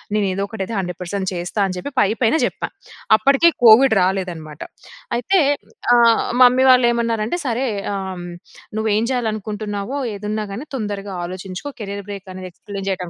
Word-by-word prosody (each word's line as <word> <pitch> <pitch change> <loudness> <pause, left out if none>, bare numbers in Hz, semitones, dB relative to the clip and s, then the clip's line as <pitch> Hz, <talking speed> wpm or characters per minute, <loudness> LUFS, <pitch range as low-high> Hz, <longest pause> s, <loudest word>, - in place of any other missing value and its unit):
నేను 210 -1 +2
ఏదో 195 +1 -2
ఒకటి 220 - -6
అయితే 230 - -5
100% 185 +1 -4
చేస్తా 175 +4 -4
అని 185 - -4
చెప్పి 285 - -6
పై 200 - +4
పైన 225 - +3
జెప్పా. - - -3 0.5
అప్పటికే 275 +7 +4 0.2
కోవిడ్ 230 +2 +7
రాలేదనమాట. 180 -5 -2 0.6
అయితే 375 +10 +2 0.6
ఆహ్, 235 -1 +4 0.2
మమ్మీ 250 +1 +5
వాళ్ళు 250 -1 +5
ఏమన్నారంటే, 230 +4 -1
సరే 245 +2 0 0.3
ఆహ్, 190 -2 -5 0.5
నువ్వు 220 0 0
ఏం 220 - +1
చేయాలనుకుంటున్నావో 215 -1 -3 0.2
ఏదున్నా 210 +1 -3
గాని 240 +9 -6
తొందరగా 205 -4 -4
ఆలోచించుకో 185 +7 -6
కెరీర్ 200 -1 -5
బ్రేక్ 200 -1 -7
అనేది 185 0 -7
ఎక్స్‌ప్లెయిన్ 195 +2 -8
చేయడం 180 -2 -3
205 Hz, 150 wpm, -20 LUFS, 190-230 Hz, 0.6 s, కోవిడ్